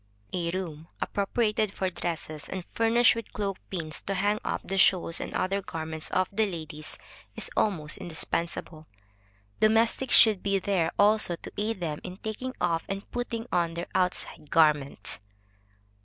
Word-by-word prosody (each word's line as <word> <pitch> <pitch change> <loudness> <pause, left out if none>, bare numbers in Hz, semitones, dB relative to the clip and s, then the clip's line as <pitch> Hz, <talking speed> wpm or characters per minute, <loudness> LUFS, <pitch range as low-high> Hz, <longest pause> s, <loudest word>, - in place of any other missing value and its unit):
A 175 -2 0
room 170 -3 -4
appropriated 210 0 0
for 190 -2 -2
dresses, 160 -3 -4
and 185 -2 -4
furnished 230 +1 +5
with 230 -1 -6
cloak 200 -2 -2
pins 160 -5 -2
to 195 - -3
hang 205 +3 +1
up - - -2
the 195 0 -2
shawls 175 -3 +4
and - - -4
other 195 +2 0
garments 160 -3 -4
of 185 -1 +2
the 215 +2 +2
ladies, 155 -4 -6 0.4
is - - +1
almost 160 -8 +1
indispensable. 165 -2 -2 0.7
Domestics 225 +4 +4
should 215 -5 +7
be 200 -1 +1
there 185 -4 +1
also 205 -3 +4
to - - -10
aid 210 -2 -2
them 155 -3 -2
in 180 - -7
taking 220 +5 -5
off 165 -1 +1
and 195 0 -5
putting 235 -2 -3
on 170 -2 +1
their 170 +1 -3
outside 180 -4 0
garments. 150 -9 +2
185 Hz, 155 wpm, -28 LUFS, 165-210 Hz, 0.7 s, should